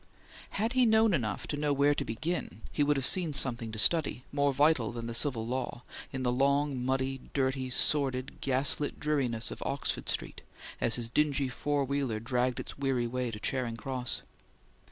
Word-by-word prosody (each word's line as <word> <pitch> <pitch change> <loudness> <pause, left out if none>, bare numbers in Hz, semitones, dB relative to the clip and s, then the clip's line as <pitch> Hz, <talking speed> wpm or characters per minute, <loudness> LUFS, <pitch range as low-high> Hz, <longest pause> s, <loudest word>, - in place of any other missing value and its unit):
Had 225 +4 0
he 255 -2 +4
known 220 -1 +4
enough 110 - -1
to 145 - -3
know 145 0 0
where 140 +1 +3
to - - -2
begin 160 +11 -4
he - - -2
would 145 0 +2
have 135 - 0
seen 175 -5 +3
something 120 -4 +4
to 110 - -7
study, 140 +2 +3
more 140 0 +2
vital 140 -4 +2
than 115 -1 -6
the 115 - -4
Civil 115 -3 0
Law, 125 0 -4 0.3
in 130 -1 -4
the 125 - +1
long, 140 0 +1
muddy, 130 0 -1
dirty, 130 -1 0
sordid, 130 -1 0
gas 135 +2 +2
lit 145 - -3
dreariness 130 -7 -1
of - - -8
Oxford - - -3
Street - - -3 0.4
as 115 -2 +5
his 120 -2 0
dingy 140 +1 +1
four 145 +2 -1
wheeler 135 -5 -1
dragged 125 +1 -1
its - - -7
weary 135 -3 0
way 125 +1 -2
to 105 -2 -7
Charing 120 0 -2
Cross. 125 +1 -2
135 Hz, 185 wpm, -30 LUFS, 120-145 Hz, 0.4 s, as